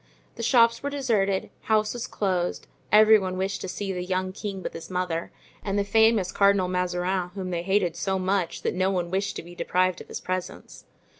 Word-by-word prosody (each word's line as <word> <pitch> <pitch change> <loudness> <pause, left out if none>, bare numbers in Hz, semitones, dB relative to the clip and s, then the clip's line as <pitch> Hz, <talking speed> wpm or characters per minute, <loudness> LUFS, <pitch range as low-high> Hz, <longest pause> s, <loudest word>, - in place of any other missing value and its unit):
The - - -8
shops 230 -1 +4
were 285 - -2
deserted, 220 -9 0
houses 220 +2 +1
closed; 185 -3 -1 0.3
every 215 +1 +7
one 185 -1 -3
wished 190 +1 -2
to - - -4
see 195 +1 -4
the 180 -1 -3
young 185 0 -1
king 195 -1 -6
with - - -4
his 165 - -8
mother, 180 -2 -2 0.3
and 200 0 -1
the 200 - +2
famous 220 -2 +3
Cardinal 200 -2 +3
Mazarin 180 0 -1
whom 185 -2 -4
they 170 -1 -1
hated 185 -2 +1
so 190 +2 -1
much 185 -2 -1
that - - 0
no 185 +1 +1
one 175 -3 -1
wished 195 +1 -1
to - - -6
be 175 +1 -12
deprived 185 0 0
of - - -12
his - - -6
presence. 185 -1 -5
190 Hz, 200 wpm, -26 LUFS, 180-205 Hz, 0.3 s, every